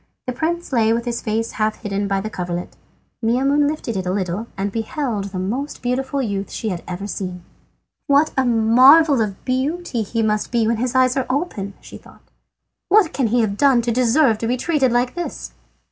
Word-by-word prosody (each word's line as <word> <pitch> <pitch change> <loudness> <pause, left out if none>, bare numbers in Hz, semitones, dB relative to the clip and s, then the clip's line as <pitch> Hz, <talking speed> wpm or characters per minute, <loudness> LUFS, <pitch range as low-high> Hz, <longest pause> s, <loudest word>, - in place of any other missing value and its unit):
The 250 - -3
prince 330 +3 -3
lay 225 -2 +3
with 235 +1 -2
his 240 -1 -3
face 225 +1 -2
half 215 +1 -2
hidden 200 -1 -2
by 195 -1 0
the 215 - -4
coverlet. 175 -1 -5 0.5
Maimoune 275 +5 +2
lifted 295 -7 -3
it 185 -1 -3
a - - 0
little 190 +3 -2
and 195 +1 -2
beheld 225 -1 -3
the 195 -1 -6
most 245 +12 -4
beautiful 265 +2 -1
youth 200 -3 -3
she 220 - -4
had 175 -3 -4
ever 180 +2 -5
seen. 185 -3 -5 0.6
"What 285 +2 +4
a 265 - +2
marvel 255 +5 +5
of 200 -3 -4
beauty 265 +1 -1
he 225 +2 -2
must 210 -1 0
be 235 -2 +2
when 230 +1 +1
his 250 +2 -2
eyes 255 0 +4
are 265 - -1
open!" 255 - -3
she - - -11
thought. - - -19 0.7
"What 395 -4 +4
can 260 -4 +1
he 240 +2 +2
have 205 -2 -1
done 265 -3 +4
to 235 - 0
deserve 245 0 +3
to 225 - -2
be 250 +2 0
treated 270 -2 +1
like 245 +1 +1
this?" 335 - -5
235 Hz, 200 wpm, -20 LUFS, 205-270 Hz, 0.7 s, marvel